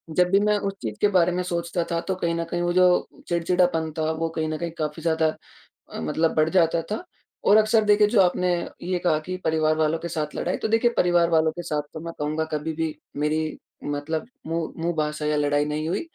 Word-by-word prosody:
जब 180 Hz, 0 st, +4 dB
भी 195 Hz, -, +5 dB
मैं 210 Hz, 0 st, +2 dB
उस 195 Hz, -1 st, -2 dB
चीज़ 110 Hz, -3 st, -4 dB
के 205 Hz, -, +5 dB
बारे 180 Hz, -3 st, +3 dB
में 180 Hz, -, -1 dB
सोचता 170 Hz, -1 st, -2 dB
था, 170 Hz, -, +1 dB
तो 190 Hz, +2 st, -2 dB
कहीं 170 Hz, -2 st, -1 dB
न 170 Hz, -, -1 dB
कहीं 175 Hz, -, -2 dB
वो 175 Hz, 0 st, +1 dB
जो 180 Hz, 0 st, +4 dB, 0.2 s
चिड़चिढ़ापन 170 Hz, -2 st, +1 dB
था, 160 Hz, 0 st, 0 dB
वो 165 Hz, +1 st, -2 dB
कहीं 160 Hz, 0 st, -1 dB
न 155 Hz, -, -2 dB
कहीं 170 Hz, +1 st, -4 dB
काफ़ी 155 Hz, 0 st, -3 dB
ज़्यादा 160 Hz, -1 st, +1 dB, 0.6 s
अ, -, -, -5 dB
मतलब 160 Hz, -, 0 dB
बढ़ 155 Hz, 0 st, +3 dB
जाता 165 Hz, -2 st, +3 dB
था। 215 Hz, +12 st, -3 dB, 0.4 s
और 205 Hz, -, +6 dB
अक्सर, 220 Hz, 0 st, +4 dB
देखिए, 210 Hz, 0 st, +5 dB
जो 210 Hz, -1 st, +3 dB
आपने 180 Hz, 0 st, +2 dB, 0.3 s
ये 180 Hz, +1 st, -1 dB
कहा 160 Hz, -3 st, +3 dB
कि 180 Hz, +4 st, -5 dB
परिवार 155 Hz, -1 st, +2 dB
वालों 155 Hz, +1 st, +1 dB
के 170 Hz, -, -5 dB
साथ 155 Hz, -2 st, -3 dB
लड़ाई, -, -, -1 dB
तो -, -, -3 dB
देखिए, 225 Hz, +2 st, +3 dB
परिवार 175 Hz, -1 st, +3 dB
वालों 160 Hz, -1 st, +3 dB
के 175 Hz, +2 st, -6 dB
साथ 150 Hz, -3 st, -2 dB
तो, 155 Hz, -, -6 dB
मैं 165 Hz, +1 st, -6 dB
कहूँगा, 155 Hz, +2 st, -1 dB
कभी 155 Hz, +1 st, -2 dB
भी 160 Hz, -1 st, -2 dB, 0.3 s
मेरी 155 Hz, +1 st, -1 dB, 0.3 s
मतलब 145 Hz, +4 st, -3 dB, 0.2 s
मुँह 165 Hz, 0 st, -2 dB
मुँह 170 Hz, +1 st, +1 dB
भाषा 150 Hz, 0 st, -1 dB
या 150 Hz, 0 st, +1 dB
लड़ाई 145 Hz, 0 st, +2 dB
नहीं 155 Hz, +1 st, -2 dB
हुई। 175 Hz, -, -1 dB
165 Hz, 230 wpm, -24 LUFS, 155-180 Hz, 0.6 s, और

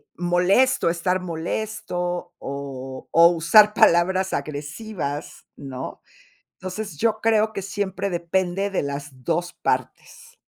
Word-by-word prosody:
molesto, 180 Hz, +6 st, +3 dB
estar 180 Hz, +2 st, 0 dB
molesto, 175 Hz, 0 st, -3 dB
o 135 Hz, -1 st, -7 dB
o 165 Hz, +1 st, +8 dB
usar 175 Hz, +6 st, +5 dB
palabras 185 Hz, 0 st, +3 dB
agresivas, 145 Hz, +2 st, -5 dB
¿no? 135 Hz, -2 st, -7 dB, 0.5 s
Entonces, 185 Hz, -2 st, -6 dB
yo 215 Hz, +5 st, +1 dB
creo 220 Hz, -1 st, +3 dB
que 195 Hz, -, -3 dB
siempre 200 Hz, -1 st, -3 dB
depende 180 Hz, +3 st, -1 dB
de 195 Hz, -, -1 dB
las 140 Hz, -2 st, -6 dB
2 175 Hz, +3 st, -1 dB
partes. 470 Hz, +1 st, -4 dB
175 Hz, 110 wpm, -23 LUFS, 150-200 Hz, 0.5 s, o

